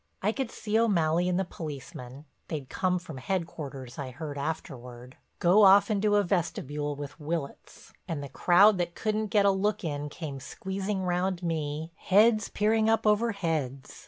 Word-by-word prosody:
I 210 - +3
could 265 0 -3
see 220 0 -1
O'Malley 175 -5 +2
and 180 0 +1
the 190 - 0
policeman 150 -4 -8 0.2
(they'd 145 -5 -5
come 185 -1 0
from 165 -5 -8
headquarters 140 -6 -5
I 135 -2 -4
heard 145 +3 -7
afterward) 125 -4 -6 0.2
go 180 +5 +5
off 200 +1 +7
into 205 0 +2
a 205 - +4
vestibule 150 -5 -2
with 145 +2 -8
Willitts 155 -2 -6
and 150 -3 -3
the - - -5
crowd 185 +8 +5
that 175 -1 -2
couldn't 215 0 -1
get 205 -1 +3
a 200 - +6
look 205 +2 0
in 145 -2 -3
came 145 -3 -6
squeezing 190 +6 -4
round 180 0 -1
me, 160 -1 -3
heads 215 +2 +4
peering 220 +1 +2
up 225 0 +2
over 215 +2 +3
heads. 150 -8 -3
175 Hz, 165 wpm, -28 LUFS, 145-200 Hz, 0.2 s, off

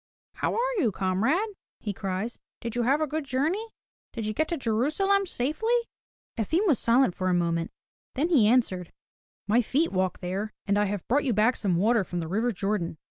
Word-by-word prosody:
"How - - -1
are - - 0
you, 235 - +2
comrade?" 210 - +1 0.3
he 205 - -4
cries. 195 +4 -4 0.2
"Did 235 0 -5
you 245 - +1
have 275 +6 +2
a - - +3
good 310 +1 -3
journey? 300 - -1 0.5
Did 225 -2 -4
you 215 - -1
get 315 +8 0
to 340 - -2
Jerusalem 310 - +1
safely?" 330 - 0 0.6
Efim 325 - +1
was 300 - +3
silent 235 -3 +3
for 185 +1 -1
a 180 - +2
moment, 170 -1 0 0.5
then 305 +6 +1
he 260 -12 +5
answered: 205 -7 +1 0.6
"My 225 +4 +4
feet 285 +8 +1
walked 185 -1 0
there, 195 +4 -3
and 205 0 +2
I 210 - +3
have 200 -2 -4
brought 285 +5 +2
you 250 - +2
back 215 +4 +3
some 190 -4 0
water 215 +4 +3
from 175 -1 -4
the 165 - -3
river 220 +8 0
Jordan. 195 -5 -2
230 Hz, 195 wpm, -27 LUFS, 195-295 Hz, 0.6 s, he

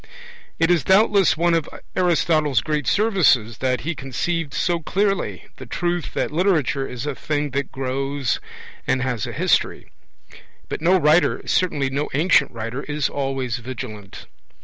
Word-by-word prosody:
It 165 +1 +3
is 170 -4 +3
doubtless 195 -2 +4
one 170 +1 +2
of 165 -3 0 0.3
Aristotle's 160 -5 +2
great 150 -4 -2
services 155 - +2
that 130 -1 0
he 170 - -2
conceived 155 +3 -3
so 175 +3 0
clearly 195 +4 -1
the - - -10
truth 175 -1 -2
that - - -1
literature 150 -6 +1
is 125 +1 -6
a 145 - -2
thing 145 +1 -2
that 140 +1 -2
grows 135 0 -2 0.5
and 130 0 +1
has 125 -5 -2
a - - -5
history. - - 0 0.8
But - - -4
no 180 +3 +4
writer, 155 +2 +3
certainly 145 -7 +1
no 145 +2 -2
ancient 170 +5 +4
writer, 115 +2 -5
is 145 -1 -2
always 135 -4 -2
vigilant. 110 -5 -8
145 Hz, 150 wpm, -22 LUFS, 130-170 Hz, 0.8 s, doubtless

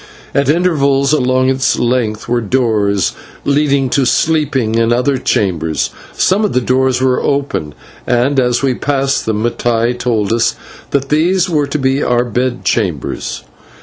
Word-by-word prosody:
At 140 0 +1
intervals 145 -4 +2
along 130 -2 +2
its 130 0 +1
length 120 -3 -1
were 120 0 0
doors 105 -5 0 0.3
leading 140 -1 +2
to 140 - +2
sleeping 140 -7 +1
and 115 0 +2
other 125 +3 +1
chambers. 80 -9 -1 0.2
Some 195 +3 +1
of 210 - 0
the 125 - +3
doors 130 +1 +1
were 130 -1 +1
open, 140 - -2 0.3
and 125 +3 +2
as 125 0 +1
we 135 -2 +2
passed 135 0 -1
them 110 -1 -1
Mattai 120 0 0
told 115 -4 -1
us 115 -1 +1 0.3
that 140 -1 -1
these 175 +4 +2
were 150 -3 +1
to 140 - -2
be 135 0 0
our 125 -2 +1
bed 125 +1 -2
chambers. 90 - -2
130 Hz, 150 wpm, -14 LUFS, 115-140 Hz, 0.3 s, the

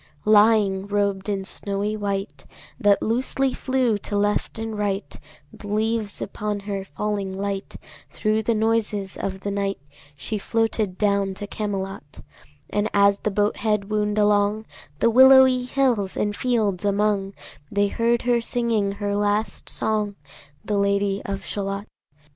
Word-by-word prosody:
Lying, 210 -2 +4
robed 200 -1 -1
in 195 -2 -2
snowy 200 +2 -3
white 200 -1 -4 0.3
That 205 -4 +3
loosely 260 +3 0
flew 255 -5 0
to 205 - -3
left 205 +2 0
and 225 0 -4
right 205 -1 -2 0.2
– - - -29
The 205 - -11
leaves 215 0 -1
upon 205 0 -4
her 200 -1 -4
falling 200 -2 -3
light 200 0 -4 0.2
– - - -21
Thro' 215 0 0
the 225 +1 0
noises 215 -3 0
of 190 0 -4
the 200 - -3
night 200 0 -1 0.4
She 210 +9 -4
floated 220 -3 -1
down 200 -2 +1
to 205 - -6
Camelot: 195 -7 -5 0.5
And 210 +1 0
as 200 0 +4
the - - -1
boat 205 +1 0
head 210 -1 -1
wound 210 0 0
along 210 +1 +2 0.3
The 230 - +3
willowy 260 0 +7
hills 250 -7 0
and 205 0 0
fields 215 -7 0
among, 200 -1 0 0.4
They 205 0 +2
heard 235 +2 +1
her 240 -1 +2
singing 230 -4 0
her 200 0 -2
last 205 +1 -1
song, 210 -2 -1 0.5
The 205 -1 0
Lady 200 0 +1
of 195 0 -4
Shalott. 200 0 -3
205 Hz, 150 wpm, -23 LUFS, 200-220 Hz, 0.5 s, willowy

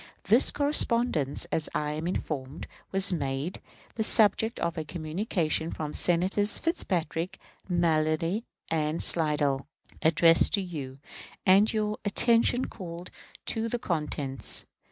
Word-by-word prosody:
This 225 +6 +5
correspondence, 235 - +1
as 160 - -1
I 150 0 -1
am 155 +2 -4
informed, 145 -5 -4 0.3
was 195 0 +2
made 140 +2 -3 0.3
the 220 - -2
subject 220 +1 +3
of 170 -1 -2
a 160 - -4
communication 160 0 -2
from 150 -2 -5
Senators 185 +4 +2
Fitzpatrick, 180 - -2 0.3
Mallory, 165 +3 0 0.3
and 155 0 -1
Slidell, 150 -4 +3 0.3
addressed 165 +1 +4
to 200 - -2
you, 140 -7 -7 0.5
and 200 +3 +5
your 215 -1 -2
attention 235 +4 +3
called 175 -2 -9 0.3
to 225 0 -2
the 240 - -2
contents. 150 - 0
170 Hz, 115 wpm, -27 LUFS, 155-205 Hz, 0.5 s, This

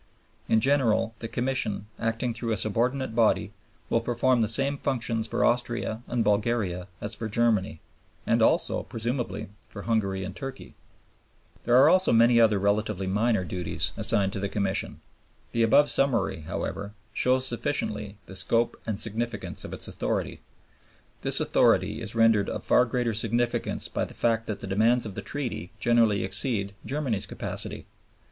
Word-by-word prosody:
In 110 - +4
general, 115 -4 +2
the 115 - -5
Commission, 120 -5 -2
acting 115 +1 -1
through 115 0 -3
a 110 - 0
subordinate 120 +5 -1
body, 110 -3 +2 0.3
will 115 - +1
perform 120 +1 +1
the 110 - +2
same 135 +6 0
functions 115 -4 -1
for - - +1
Austria 120 -2 -1
and 120 -2 0
Bulgaria 105 -4 0
as 105 - -4
for 110 0 -4
Germany, 105 -8 +1 0.4
and - - +2
also, - - +3
presumably, 120 -1 -4 0.2
for 100 - -8
Hungary 100 -4 0
and 95 0 -6
Turkey. 135 +1 -8 0.9
There 120 - +3
are 130 - +7
also 185 0 +4
many 115 +1 +5
other 110 -2 +4
relatively 100 0 0
minor 105 +1 +1
duties 90 +1 -1
assigned 95 -1 +1
to 100 - -3
the 100 0 -2
Commission. 100 -2 -2 0.5
The 115 - 0
above 140 +6 +5
summary, 115 - 0
however, 100 +1 -4 0.2
shows 130 +3 +2
sufficiently 110 -5 -2
the 95 - -10
scope 115 +5 +1
and 110 -2 -2
significance 115 -1 -3
of - - -8
its - - -6
authority. - - -3 0.8
This - - +5
authority - - +2
is - - -6
rendered 115 -3 +4
of - - -4
far 125 - +4
greater 120 -1 -1
significance 115 +2 -1
by - - -2
the - - -11
fact 115 -1 0
that 105 - -4
the - - -5
demands 110 +5 +2
of 105 - -6
the - - -5
Treaty 125 - -4
generally 115 -3 +3
exceed 100 0 -1
Germany's 130 -8 -2
capacity. - - -3
115 Hz, 155 wpm, -27 LUFS, 105-120 Hz, 0.9 s, are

